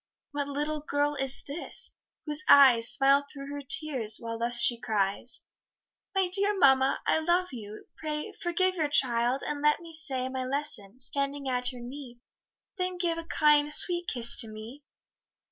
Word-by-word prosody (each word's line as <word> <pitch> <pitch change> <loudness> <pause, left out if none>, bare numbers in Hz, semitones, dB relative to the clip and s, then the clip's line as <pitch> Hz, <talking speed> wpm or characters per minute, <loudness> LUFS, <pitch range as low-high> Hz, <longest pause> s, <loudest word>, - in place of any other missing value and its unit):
What 285 -1 -3
little 295 +2 -3
girl 290 0 -1
is 270 -2 -2
this, 315 +10 -7 0.3
whose 300 0 -2
eyes 250 -5 +6
Smile 275 +1 +3
through 275 -1 -9
her 285 - -6
tears, 265 -6 +1
while 230 -1 -6
thus 240 +1 +5
she 240 0 +4
cries? 205 +2 -2 0.7
"My 380 -1 +2
dear 400 +3 +3
mamma, 265 -4 +3
I - - +2
love 350 +3 0
you, 215 -4 -10
pray 300 -1 -5
Forgive 370 0 -1
your 315 -5 -2
child, 245 -2 +3
and 295 -1 -4
let 300 0 +2
me 335 -1 -12
say 270 -5 -2
My 260 0 -4
lesson, 255 -6 -4
standing 275 +2 -1
at 250 -1 -1
your 250 -1 -11
knee, 250 -1 -10 0.6
Then 365 0 -2
give 340 -2 -1
a 330 - -8
kind 300 -2 +2
sweet 350 +3 -2
kiss 235 -2 +1
to 225 - +4
me." 220 +6 -10
280 Hz, 165 wpm, -28 LUFS, 245-310 Hz, 0.7 s, eyes